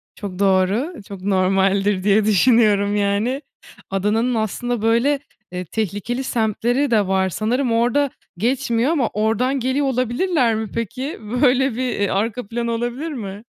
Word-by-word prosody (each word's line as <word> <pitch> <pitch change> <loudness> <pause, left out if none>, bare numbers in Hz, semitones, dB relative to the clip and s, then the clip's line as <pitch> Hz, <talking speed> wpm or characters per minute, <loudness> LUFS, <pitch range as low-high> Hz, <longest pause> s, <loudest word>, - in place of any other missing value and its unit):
Çok 195 -3 -7
doğru, 200 - +2
çok 200 -2 -9
normaldir 195 0 +1
diye 205 +1 +3
düşünüyorum 210 -1 +3
yani 205 +6 0 0.5
Adana'nın 215 +6 0
aslında 225 +2 -2
böyle, 235 +6 +2 0.3
eee, 180 0 -5
tehlikeli 220 +6 -3
semtleri 240 +3 0
de 210 -4 +3
var 190 0 +1
sanırım 235 +7 -1
orda 245 +5 +2 0.3
geçmiyor 235 - +1
ama 280 -8 +1
ordan 225 +6 0
geliyor 260 +3 0
olabilirler 255 +1 +1
mi 220 -1 -3
peki? 255 - -4
Böyle 250 +4 +2
bir, - - -7
eee, 205 -4 -1
arka 215 +3 -2
plan 235 +2 -3
olabilir 240 +7 -3
mi? 210 -5 -6
225 Hz, 135 wpm, -20 LUFS, 200-250 Hz, 0.5 s, diye